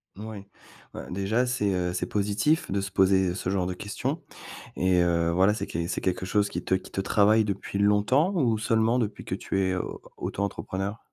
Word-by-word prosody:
Mouais. 105 -1 -8 0.5
Bah, - - -7
déjà, 100 +7 0
c'est, 125 -5 0
heu, 90 -1 -1
c'est - - -1
positif 105 +8 +1
de 100 0 0
se 95 0 -5
poser, 95 -1 +3
heu, 90 - -3
ce 95 - -3
genre 95 -2 0
de 90 - -2
questions. 125 - -4 0.5
Et 90 -1 +3
heu, 85 -1 +2
voilà 95 +4 +4
c'est 110 - -4
qu 85 +1 -3
c'est - - -3
quelque 95 0 -1
chose 100 +2 +1
qui - - -4
te - - -1
qui 95 - -6
te 95 - -2
travaille 105 +2 +4
depuis 100 0 -3
longtemps 105 - +3
ou 120 -9 +2
seulement 110 +2 +2
depuis 105 -3 -3
que - - -2
tu 95 - -2
es 95 -1 +1
au 90 - -4 0.2
auto-entrepreneur? 100 +1 -3
100 Hz, 205 wpm, -27 LUFS, 95-110 Hz, 0.5 s, voilà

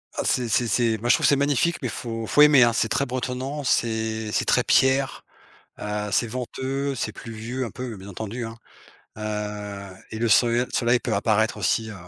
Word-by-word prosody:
Ah - - -1
c'est 125 -1 +1
c'est 120 +2 +1
c'est 115 +1 +1
moi 120 +2 -2
je - - +7
trouve - - 0
c'est 140 - +5
magnifique, 145 +4 +1
mais 130 - -1
il - - -4
faut 115 +1 -5
il - - -9
faut 145 - +4
aimer, 150 -3 +7
hein. 120 -1 +6
C'est 115 - +1
très 140 - 0
bretonnant, 130 +3 -3
c'est 110 -3 0
c'est - - 0
très - - +3
pierre, 135 0 +2 0.5
heu, 105 0 -3
c'est 100 - +1
venteux, 130 +3 -3
c'est 110 - -3
pluvieux 115 +4 -5
un 115 - -5
peu, 125 -4 -6
bien 95 +1 -11
entendu, 110 +4 -5
hein. 115 0 -7 0.6
Heu 105 -2 -5 0.2
et 110 - -5
le 115 - +1
soleil- 120 +3 +4
soleil 120 0 +2
peut - - -3
apparaître 110 +2 +1
aussi, 110 +3 0
heu, 105 - -8
115 Hz, 210 wpm, -24 LUFS, 110-130 Hz, 0.6 s, je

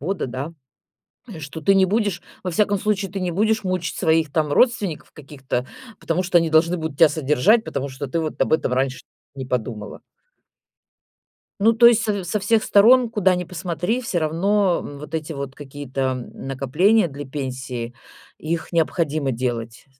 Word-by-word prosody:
бода, 185 +4 -2
да 130 +6 -5 0.9
что 145 +2 -8
ты 195 +5 +4
не 190 -1 +4
будешь, 205 -3 0 0.2
во 185 - -3
всяком 205 +4 +2
случае, 200 -2 -1
ты 195 - -4
не 180 -1 -2
будешь 215 +3 +1
мучить 185 -2 -2
своих, 160 -3 +2
там, 150 -1 0
родственников 210 - +1
каких-то, 135 -3 -5 0.3
потому 170 +3 -1
что 180 -1 +1
они 165 -1 +3
должны 165 +3 +3
будут 160 -3 -5
тебя 160 - +7
содержать, 160 - +2
потому 140 0 -4
что 130 +1 -6
ты 165 +6 -1
вот 155 -1 -4
об - - -1
этом 145 -5 +1
раньше 130 0 -1 0.3
не 135 -2 -6
подумала. 110 -4 -4 1.6
Ну, 225 +3 +5
то 235 +1 +6
есть 235 -1 +6
с 205 -3 -1
со 175 +5 -1
всех 215 +2 +2
сторон, 240 +4 +5
куда 190 -4 +2
ни 180 0 -2
посмотри, 180 +6 -3
всё 185 -6 -1
равно, 180 +4 +1
м, 145 -1 -9
вот 150 +2 -10
эти 160 0 -3
вот 140 -1 -6
какие-то, 135 -3 -4
м, - - -10
накопления 165 - +2
для 145 0 -8
пенсии, 130 -3 -5 0.4
их 160 +2 -4
необходимо 155 -4 0
делать. 115 0 -4
160 Hz, 170 wpm, -22 LUFS, 140-195 Hz, 1.6 s, тебя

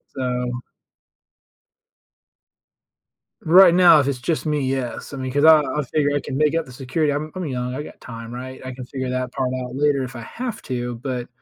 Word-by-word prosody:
So 125 -1 -2 2.8
right 175 +1 +8
now, 175 -4 +7
if 140 - +1
it's 140 -3 -1
just 155 +6 -2
me, 150 -1 0
yes, 130 0 -3
I - - -5
mean, 130 -1 -4
'cause 145 +3 +2
I'll 160 -1 +8
I'll 150 - 0
figure 145 +2 0
I - - +2
can 135 - -5
make 150 +1 +2
up 165 - 0
the 125 - -13
security, 140 +4 -1
I'm 155 +2 -3
I'm 185 -1 -3
young, 125 -3 -3
I 150 - -4
got - - -13
time, 115 -1 -8
right? 130 +1 -7
I 130 - -5
can 130 0 -8
figure 130 0 -4
that 130 -1 -2
part 130 -2 -1
out 125 0 -7
later 140 -1 +2
if 130 0 -7
I 120 - -6
have 235 - -6
to, 120 -2 -3
but, 125 0 -4
130 Hz, 205 wpm, -22 LUFS, 125-150 Hz, 2.8 s, right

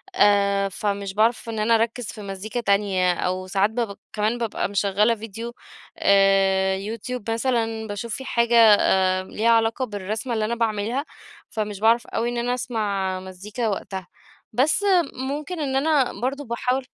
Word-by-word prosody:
آآ 200 - +3
فمش 200 0 -3
باعرف 225 +3 +1
إن 220 - -3
أنا 225 +2 +3
أركِّز 230 +2 0
في 220 - -8
مزيكا 200 +4 -5
تانية، 200 -4 +2
أو 185 +1 -2
ساعات 195 +2 +2
باب 220 -3 -3 0.2
كمان 215 +3 0
بابقى 230 -4 -2
مِشغّلة 205 +3 +2
فيديو 225 +2 -7 0.4
آآ 195 -1 +4
يوتيوب 225 +3 -5
مثلًا 225 -2 -1
باشوف 205 +2 -4
في 265 - -7
حاجة 235 -1 +1 0.5
آآ 185 0 +1
ليها 225 +4 0
علاقة 230 +2 +2
بالرسمة 215 +2 -4
اللي 220 -1 0
أنا 225 +2 -1
باعملها، 230 +3 -1 0.5
فمش 210 -2 -4
باعرف 230 +2 +3
أوي 230 +1 -2
إن 240 - -3
أنا 245 +1 0
أسمع 200 -6 -2
مزيكا 200 +5 -5
وقتها. 190 -2 -4 0.5
بس 280 - +2 0.3
ممكن 290 +6 -4
إن 270 -3 -1
أنا 280 -2 +1
برضه 275 +4 -2
باحاول 250 +2 -1
220 Hz, 150 wpm, -23 LUFS, 200-235 Hz, 0.5 s, آآ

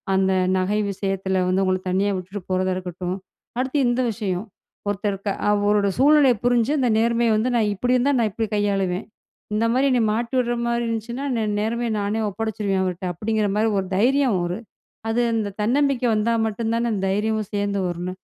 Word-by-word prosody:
அந்த 190 0 +2 0.3
நகை 195 +3 0
விஷயத்துல 195 -1 -2
வந்து, 190 +1 +2
உங்கள 185 0 0
தனியா 195 +2 +1
விட்டுட்டு 185 +2 -6
போறதா 185 0 +1
இருக்கட்டும், 180 0 -4 0.4
அடுத்து 260 +3 -1
இந்த 240 +1 +1
விஷயம். 200 -3 -3 0.4
ஒருத்தர் 205 0 -1
க்க 205 - -2 0.2
அவரோட 205 0 +2
சூழ்நிலைய 280 -2 +5
புரிஞ்சு, 245 +1 +3
அந்த 250 -2 +2
நேர்மைய 235 +1 +2
வந்து 225 +4 +1
“நான் 215 -2 +2
இப்படி 245 +6 +1
இருந்தா, 255 +3 +2
நான் 225 -2 +2
இப்டி 225 +3 -2
கையாளுவேன். 195 -2 0 0.5
இந்த 215 +2 +1
மாரி 265 +2 +3
நீ 245 - +3
மாட்டி 235 +3 -3
விடுற 240 -1 +1
மாரி 235 0 0
இருந்துச்சுன்னா, 235 +4 -3
நே 225 - 0 0.2
நேர்மையா 230 +2 -1
நானே 205 +2 -1
ஒப்படைச்சுருவேன் 210 -2 -2
அவர்ட்ட!” 180 -1 -3
அப்படிங்கிற 215 +4 0
மாரி 220 +1 +2
ஒரு 190 - -3
தைரியம் 255 0 +3
ஒரு 175 +2 -3 0.5
அது 230 +2 +1
அந்த 220 -2 0
தன்னம்பிக்கை 260 +2 +2
வந்தா 215 +2 +1
மட்டுந்தானே, 230 +2 -1 0.2
தைரியமும் 210 +2 0
சேந்து 200 -1 -1
வரும், 175 -1 -3
என்ன? 185 - -7
215 Hz, 170 wpm, -23 LUFS, 195-235 Hz, 0.5 s, சூழ்நிலைய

